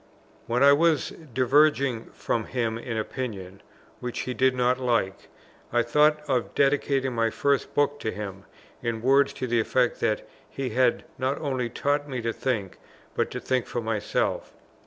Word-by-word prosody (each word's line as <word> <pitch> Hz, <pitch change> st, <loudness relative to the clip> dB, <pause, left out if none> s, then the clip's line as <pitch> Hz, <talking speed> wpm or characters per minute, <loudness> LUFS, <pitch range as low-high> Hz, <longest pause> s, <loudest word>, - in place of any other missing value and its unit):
When 125 Hz, +3 st, +2 dB
I 140 Hz, 0 st, +8 dB
was 160 Hz, -1 st, +2 dB, 0.2 s
diverging 130 Hz, -1 st, +3 dB
from 115 Hz, -2 st, -1 dB
him 115 Hz, -2 st, -2 dB
in 115 Hz, -1 st, -4 dB
opinion 100 Hz, -5 st, -5 dB, 0.4 s
(which 125 Hz, -1 st, -4 dB
he 125 Hz, -, -3 dB
did 130 Hz, 0 st, +2 dB
not 125 Hz, +1 st, +2 dB
like), 115 Hz, -7 st, -1 dB, 0.4 s
I 120 Hz, 0 st, +3 dB
thought 150 Hz, +5 st, +3 dB
of 130 Hz, -4 st, -1 dB
dedicating 135 Hz, -2 st, +2 dB
my 115 Hz, -1 st, +1 dB
first 140 Hz, +4 st, 0 dB
book 145 Hz, 0 st, +2 dB
to -, -, -2 dB
him, 100 Hz, -2 st, -7 dB, 0.4 s
in 115 Hz, -1 st, -3 dB
words 135 Hz, +2 st, +4 dB
to -, -, -4 dB
the 120 Hz, -1 st, +1 dB
effect 125 Hz, +2 st, +1 dB
that 105 Hz, -, 0 dB, 0.2 s
he 135 Hz, -3 st, -4 dB
had 125 Hz, +1 st, +2 dB, 0.2 s
not 130 Hz, +2 st, 0 dB
only 130 Hz, -5 st, -2 dB
taught 145 Hz, +4 st, -1 dB
me 130 Hz, -2 st, -3 dB
to 115 Hz, 0 st, -1 dB
think, 110 Hz, -8 st, -3 dB, 0.3 s
but -, -, 0 dB
to -, -, -5 dB
think 130 Hz, -2 st, -1 dB
for -, -, -3 dB
myself. 110 Hz, -2 st, -2 dB
125 Hz, 165 wpm, -26 LUFS, 115-140 Hz, 0.4 s, I